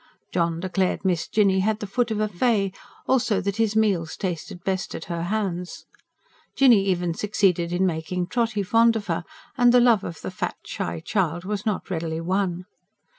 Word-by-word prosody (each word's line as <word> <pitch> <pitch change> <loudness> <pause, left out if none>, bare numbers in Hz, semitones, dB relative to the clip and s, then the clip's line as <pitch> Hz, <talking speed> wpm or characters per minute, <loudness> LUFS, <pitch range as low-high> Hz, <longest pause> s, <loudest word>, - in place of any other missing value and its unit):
John 170 -2 0
declared 185 +1 -1
Miss 175 -3 +1
Jinny 200 -3 +3
had 215 +2 +1
the 210 - -4
foot 235 +4 0
of 220 -1 -2
a 215 - +1
fay; 200 -1 +1 0.3
also 240 -6 +2
that 200 +1 -2
his 220 -2 +1
meals 195 -7 +1
tasted 175 -2 -4
best 190 -1 -2
at - - -6
her 170 -1 -4
hands. 180 -3 -3 0.7
Jinny 240 -8 +5
even 175 -2 0
succeeded 180 -3 +1
in 180 +2 +1
making 175 +1 -2
Trotty 225 +1 -1
fond 230 +4 +4
of 215 -2 -3
her; - - -2 0.4
and 245 0 +6
the 250 - +6
love 235 -5 +4
of 165 - -7
the - - -5
fat, - - -3
shy 85 -1 -4
child 175 - -1
was 205 +1 -3
not 205 -2 -2
readily 160 -2 -2
won. 180 0 -1
190 Hz, 180 wpm, -24 LUFS, 175-215 Hz, 0.7 s, and